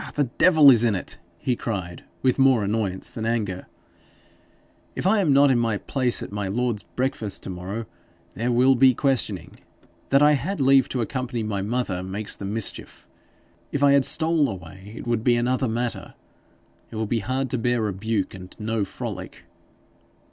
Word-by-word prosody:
'The 145 - +2 0.2
devil 155 -5 +7
is 120 -2 +4
in 115 -3 +2
it!' 90 - -4 0.2
he 125 - -1
cried, 95 -8 -5 0.2
with 130 +1 +2
more 130 -5 +4
annoyance 100 -2 -2
than 110 - -6
anger. 110 -5 -2 1.3
'If - - -4
I 210 +3 +4
am 175 -7 +2
not 140 0 +5
in 125 - +2
my 115 -3 0
place 125 +2 -1
at - - -8
my 100 -1 -3
lord's 115 +1 -1
breakfast 125 -6 -3
to - - -5
morrow, 95 +6 -5 0.5
there 120 +4 -1
will 125 +3 +5
be 130 0 +5
questioning. 115 - -1 0.5
That 140 +1 +4
I 150 - +6
had 150 +7 -1
leave 135 -1 +4
to 125 - -2
accompany 125 -1 -3
my 105 -2 -2
mother 105 -3 -2
makes 100 +3 -5
the 100 - -7
mischief. 105 +2 -4 0.6
If 145 - -1
I 140 - +6
had 140 -1 +5
stole 155 +1 +2
away, 95 +2 -9
it - - -7
would 120 -2 -1
be 120 0 +4
another 125 +2 0
matter. 120 +1 -3 0.7
It - - -10
will 110 0 -1
be 115 +2 -1
hard 130 +3 -2
to 130 - -1
bear 120 0 0
rebuke, 105 0 -2
and 90 -1 -11
no 110 0 -1
frolic.' 95 -2 -7
120 Hz, 175 wpm, -24 LUFS, 100-130 Hz, 1.3 s, devil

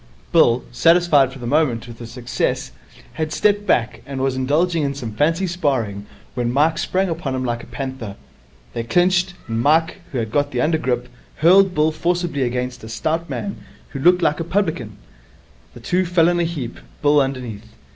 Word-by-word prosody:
Bill, - - +4
satisfied 150 - +4
for 135 - -10
the 120 - -8
moment 125 -4 +1
with 115 -1 -11
his 115 -1 -8
success, 125 -1 -2 0.4
had 155 -1 -3
stepped 205 +4 +1
back, 120 0 +1
and 135 -1 -5
was 135 0 0
indulging 155 +6 +1
in 140 -1 -1
some 120 -6 -6
fancy 165 - +1
sparring, 130 - -1 0.3
when 120 -2 -1
Mike 155 +5 +2
sprang 190 +1 0
upon 160 -6 -3
him 130 0 -2
like 120 -1 -2
a - - -12
panther. 130 -7 -6 0.6
They - - -2
clinched, 180 +5 +2
and 115 0 -1
Mike, 160 +7 +2
who 135 - -3
had 110 -2 -2
got 145 +3 +1
the 125 - -3
under 160 +3 +2
grip, 125 -3 -1 0.3
hurled 185 +4 +5
Bill 155 +1 +3
forcibly 170 -2 -1
against 125 0 -2
a 110 - -8
stout 160 +8 -2
man 200 - -4 0.3
who 135 - -6
looked 180 +5 +4
like 150 - +2
a - - -1
publican. 160 - -2 0.8
The - - -10
two 180 +10 0
fell 170 -1 +4
in 175 0 +1
a 170 - +2
heap, 150 -8 -5 0.2
Bill 145 0 +5
underneath. 125 -5 -4
145 Hz, 185 wpm, -20 LUFS, 125-170 Hz, 0.8 s, hurled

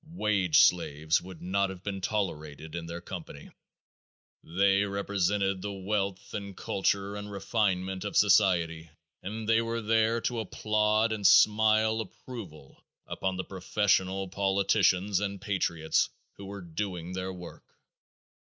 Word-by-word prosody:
Wage 100 - +3
slaves 75 +2 +2
would 90 -2 -11
not 100 +2 +1
have 95 -1 -9
been 100 -2 -4
tolerated 80 -7 -3
in 85 -1 -5
their 85 +1 -6
company. 85 -6 -9 0.9
They 95 +4 +2
represented 100 -1 0
the 100 +1 -4
wealth 100 0 -3
and 100 -2 -6
culture 100 +1 -1
and 105 0 -7
refinement 95 -2 -1
of - - -2
society 85 -5 +3 0.3
and 110 +3 -6
they 115 0 +4
were 115 0 -2
there 110 +1 +2
to 120 -1 -2
applaud 110 +1 +1
and 105 -3 +2
smile 110 +1 +5
approval 100 - -10 0.2
upon 95 -1 -3
the 95 - -2
professional 95 0 0
politicians 95 0 +2
and 100 -1 -3
patriots 85 -5 0 0.3
who 100 - -9
were 100 0 -7
doing 90 0 -5
their 95 0 -3
work. 90 -2 -12
100 Hz, 130 wpm, -29 LUFS, 90-105 Hz, 0.9 s, smile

